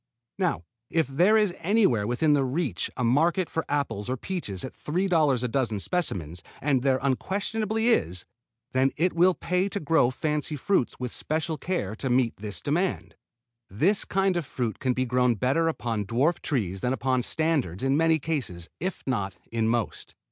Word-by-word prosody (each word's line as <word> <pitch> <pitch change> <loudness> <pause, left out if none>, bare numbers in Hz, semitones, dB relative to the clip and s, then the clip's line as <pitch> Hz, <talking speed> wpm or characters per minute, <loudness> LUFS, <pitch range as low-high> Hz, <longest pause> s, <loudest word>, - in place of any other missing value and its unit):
Now 180 - 0 0.3
if 165 -1 +2
there 175 - +4
is 210 -4 +2
anywhere 170 - +2
within 145 +5 +3
reach 135 - -1
a 125 - -1
market 165 +9 +2
for 160 - -1
apples 140 -7 -1
or 130 - -1
peaches 120 - -4
at 130 - -8
$3 155 -6 +1
a - - +1
dozen 115 -4 -1
specimens 90 - -1 0.2
and 135 -3 +1
there 135 0 +3
unquestionably 215 - 0
is 90 - +1 0.5
then 130 +1 +3
it 175 +4 +2
will 175 +2 +4
pay 180 +2 0
to 200 - -3
grow 155 -6 +3
fancy 150 +3 -2
fruits 150 -2 0
with 125 -1 -3
special 160 +1 -2
care 140 - -2
to 135 - -3
meet 125 -2 +2
this 105 -3 -5
demand. 175 +6 -1 0.6
This 165 - +2
kind 195 -1 +1
of 170 - -1
fruit 120 -4 -3
can 130 -1 +1
be 130 +1 0
grown 125 -1 +2
better 135 +9 +1
upon 115 -10 -2
dwarf 135 - +1
trees 95 - -2
than 125 - 0
upon 130 0 +1
standards 140 - 0
in 135 +1 +2
many 160 +1 +4
cases, 130 - -3
if 185 +2 -3
not 100 -8 -1 0.2
in 115 -1 0
most. 115 -3 -2
135 Hz, 170 wpm, -26 LUFS, 120-170 Hz, 0.6 s, there